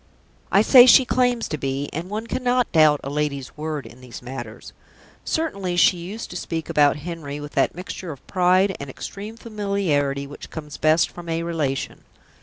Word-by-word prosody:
I 200 - +5
say 250 +1 +8
she 260 +1 +8
claims 245 -2 +1
to 155 - -3
be, 135 +1 -2
and 170 +4 -5
one 215 +2 -4
cannot 250 +1 0
doubt 155 -3 +5
a 135 - -4
lady's 145 -2 -3
word 155 -2 -4
in 120 +2 -13
these 125 -1 -10
matters; 120 -3 -8 0.5
certainly 200 - -2
she 180 - +5
used 195 +7 -7
to - - -8
speak 165 -2 -4
about 145 -1 +4
Henry 155 -4 -5
with 145 0 -8
that - - +1
mixture 180 -1 -6
of 140 - -12
pride 185 +1 +2
and 140 - -7
extreme 205 - -8
familiarity 195 -11 -1
which 145 +1 -10
comes 150 -2 -8
best 155 +2 +3
from 175 -1 -9
a 165 0 -1
relation. 155 -5 -3
165 Hz, 180 wpm, -23 LUFS, 145-200 Hz, 0.5 s, say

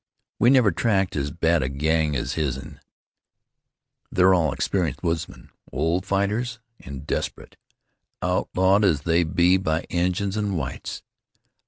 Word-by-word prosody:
We 120 - +5
never 125 -6 +5
tackled 95 -5 0
as 70 - -3
bad 85 0 +1
a 65 - -1
gang 75 +2 0
as 65 0 -2
his'n; 70 -4 -4 1.3
they're 95 +1 +5
all 80 -5 +2
experienced 85 -5 -2
woodsmen, 80 -7 -3 0.2
old 85 +6 -1
fighters, 105 +5 -1 0.2
an' 65 -1 -8
desperate, 75 - -4 0.6
outlawed 95 +2 +2
as 80 -8 +3
they 85 +2 +2
be 85 +3 +3
by 80 -3 -1
Injuns 90 +3 0
an' 105 -2 -1
whites. 65 -6 -5
85 Hz, 130 wpm, -24 LUFS, 75-95 Hz, 1.3 s, We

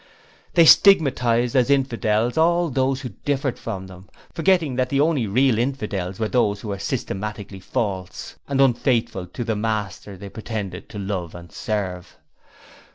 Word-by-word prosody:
They 170 -2 +7
stigmatized 125 - +5
as 130 0 +3
'infidels' 120 -4 +1
all 170 0 +2
those 130 +1 0
who 130 - -5
differed 140 -2 -1
from 95 -5 -5
them, 95 0 -13 0.2
forgetting 165 -5 +2
that 130 -1 +1
the 140 - 0
only 145 -6 +2
real 120 +2 +2
infidels 105 -8 -3
are 110 - 0
those 105 -4 +1
who 105 - -5
are 100 - -4
systematically 105 0 -4
false 95 -1 -4
and 140 -1 -1
unfaithful 120 -6 +1
to 105 +7 -5
the 110 -1 -1
Master 105 -2 -3
they 100 +2 -9
pretend 105 -4 -6
to 105 - -9
love 95 -4 -4
and 85 -1 -11
serve. 95 -5 -4
115 Hz, 155 wpm, -22 LUFS, 100-135 Hz, 0.2 s, They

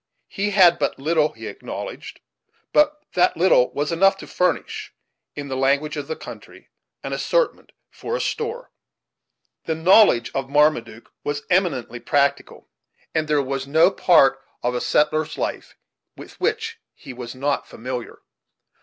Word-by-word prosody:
He 205 +1 -2
had 185 -4 +5
but - - -1
little, 155 +2 +1
he - - -10
acknowledged; - - -8 0.5
but 300 0 +3
that 180 0 +2
little 165 -8 +4
was 145 +3 -2
enough 195 +4 +3
to - - -10
furnish, 180 0 -2 0.4
in 145 -1 -6
the 135 - -4
language 140 +3 +1
of 145 -2 -5
the 160 - -3
country, - - -12 0.3
an - - -4
assortment - - -1 0.2
for 475 - -5
a - - -2
store. 460 +2 -4 0.9
The 160 - -1
knowledge 165 - +5
of 135 -1 -3
Marmaduke 140 -6 +1
was 145 0 -3
eminently 155 -10 0
practical, 140 +3 -1 0.5
and 155 -1 0
there 150 -2 +2
was 135 0 -4
no 160 +6 +4
part 135 -8 +4 0.2
of 120 +1 0
a 125 - -2
settler's 155 +1 +1
life - - -4 0.4
with - - -13
which - - -1 0.2
he 130 - -10
was 120 0 -8
not 140 +2 -1
familiar. 125 0 -7
150 Hz, 145 wpm, -22 LUFS, 135-180 Hz, 0.9 s, had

